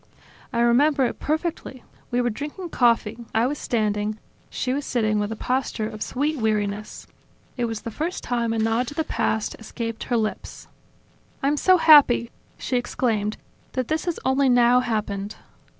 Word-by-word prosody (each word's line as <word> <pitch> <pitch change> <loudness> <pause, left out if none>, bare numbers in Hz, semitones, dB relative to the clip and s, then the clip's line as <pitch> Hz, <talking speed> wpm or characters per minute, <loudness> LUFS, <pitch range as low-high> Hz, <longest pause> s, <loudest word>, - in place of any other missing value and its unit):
I 235 -2 0
remember 265 +4 +4
it - - -3
perfectly: 310 -5 -3 0.3
we 245 0 +1
were 240 -1 0
drinking 300 - -6
coffee, 235 -4 +2 0.2
I 225 +2 +3
was 285 +3 -2
standing, 210 -2 -1 0.3
she 255 - -2
was 285 +2 -2
sitting 215 -5 0
with 205 +1 -2
a - - -3
posture 250 -2 -1
of 215 -1 -9
sweet 295 +3 -1
weariness. 210 -1 -2 0.5
It 245 - -1
was 225 -2 -4
the 230 - -6
first 320 - -3
time 235 -2 -1
a 225 - -1
nod 225 +3 +1
to 290 - -7
the 320 - 0
past 220 -7 -1
escaped 230 0 -5
her 240 - 0
lips. 215 -1 -4 0.8
"I'm 285 +2 +2
so 370 +5 +4
happy," 285 -8 +6 0.3
she 255 - -1
exclaimed, 220 -4 -1 0.4
"that 255 -2 -2
this 315 +2 -1
has 345 -2 -2
only 265 +1 +3
now 245 0 +5
happened!" 210 -4 -2
240 Hz, 165 wpm, -24 LUFS, 220-275 Hz, 0.8 s, happy